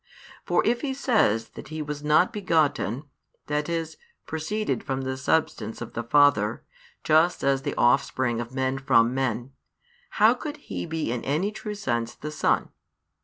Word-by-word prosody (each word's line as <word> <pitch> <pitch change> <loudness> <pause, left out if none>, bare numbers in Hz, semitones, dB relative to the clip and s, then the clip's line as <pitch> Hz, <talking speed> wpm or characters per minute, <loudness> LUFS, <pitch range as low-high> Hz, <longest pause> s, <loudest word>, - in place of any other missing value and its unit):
For - - +2
if 240 +1 +1
he 270 -3 -2
says 115 - +2
that - - -11
He 155 0 -6
was 150 0 -6
not 155 +8 +3
begotten, 155 - +1 0.4
that 150 +2 -1
is, 165 -1 -3 0.3
proceeded 205 +7 -2
from 135 -1 -3
the 130 0 -2
Substance 130 -5 -1
of - - -7
the 120 - -2
Father, 120 -4 +3 0.4
just 160 +3 +3
as 135 -1 +2
the - - -3
offspring 120 0 +2
of 120 0 -7
men 130 0 -1
from 125 -3 +3
men, 130 -1 -2 0.7
how 215 +3 +6
could 295 +4 -6
He - - -6
be 160 -6 -2
in 120 -1 -3
any 160 +9 0
true 210 -1 -6
sense 120 - -2
the 150 - -6
Son? 150 - +1
145 Hz, 165 wpm, -26 LUFS, 125-170 Hz, 0.7 s, how